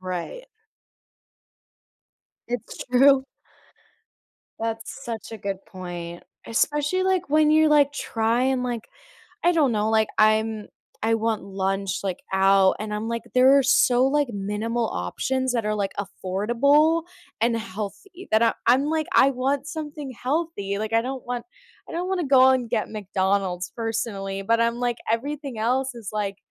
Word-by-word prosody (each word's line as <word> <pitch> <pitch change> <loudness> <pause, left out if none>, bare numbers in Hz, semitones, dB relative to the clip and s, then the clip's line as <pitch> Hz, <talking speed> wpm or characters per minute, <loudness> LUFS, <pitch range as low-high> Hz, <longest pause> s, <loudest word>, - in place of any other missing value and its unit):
Right. 185 - -5 2.0
It's 245 -2 -5
true. 265 +1 +5 1.3
That's 225 +4 -5
such 225 -2 -6
a 220 - -7
good 195 -1 -4
point. 175 -2 -7 0.2
Especially, 295 +9 +1
like, 375 -4 0
when 305 +1 +4
you're, 310 0 +5
like, 290 -1 +4
trying, 250 +1 0
like 240 -3 -3 0.6
I 350 - +5
don't 300 -7 +3
know. 215 0 0
Like, 220 -1 +3
I'm 215 0 +2 0.4
I 225 0 +2
want 225 -1 0
lunch, 195 -1 -2
like, 190 -2 -2 0.2
out 195 0 +4
and 215 0 -5
I'm, 210 +2 -3
like, 230 0 -2
"There 265 +2 +6
are - - +4
so, 255 -1 +4
like, 290 -2 +1
minimal 215 +4 -2
options 260 - -2
that 230 -3 0
are, 215 - 0
like, 200 -2 -1
affordable 240 - +2 0.4
and 230 0 +2
healthy." 230 - -7
That 220 +1 +4
I 230 - +4
I'm, 255 +4 +4
like, 315 0 0
"I 270 - +6
want 270 +2 -1
something 300 -3 -6
healthy." 255 -9 -2
Like, 220 +1 -3
I 230 - +4
don't 260 0 -5
want 245 -1 -3 0.4
I - - -10
don't 355 +2 -3
wanna 370 -3 -1
go 265 -1 +6
and 255 -2 +1
get 225 -2 -1
McDonald's, 190 -3 -1
personally. 205 -4 -3
But 230 +3 +1
I'm, 230 0 +2
like, 245 -1 -1
"Everything 275 0 -3
else 255 +3 0
is, 225 -5 -8
like 205 -2 -3
230 Hz, 150 wpm, -24 LUFS, 210-275 Hz, 2.0 s, There